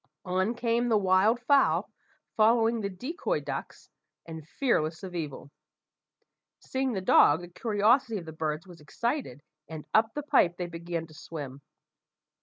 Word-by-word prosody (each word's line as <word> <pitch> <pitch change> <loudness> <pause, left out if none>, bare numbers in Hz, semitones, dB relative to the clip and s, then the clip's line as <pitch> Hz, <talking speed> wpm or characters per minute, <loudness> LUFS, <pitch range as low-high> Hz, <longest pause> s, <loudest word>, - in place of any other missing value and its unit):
On 185 +5 0
came 235 0 0
the 220 - +4
wild 195 +4 +3
fowl, 275 +3 +3 0.5
following 225 +1 +3
the 200 - -2
decoy 315 - -3
ducks - - -7 0.3
and 160 -2 -9
fearless 165 - -1
of 185 -2 -7
evil. 150 -4 -6 1.1
Seeing 260 -1 -2
the 190 - -2
dog, 160 -3 +5
the 175 - -9
curiosity 220 +5 +1
of 175 - -7
the 160 - -8
birds 155 +1 -3
was 175 -4 -14
excited, 235 - -3 0.3
and 160 -2 -8
up 225 +1 +3
the 295 - -3
pipe 175 - +3
they 180 - -3
began 170 -1 -5
to 160 - -17
swim. 145 -3 -8
190 Hz, 150 wpm, -28 LUFS, 165-235 Hz, 1.1 s, dog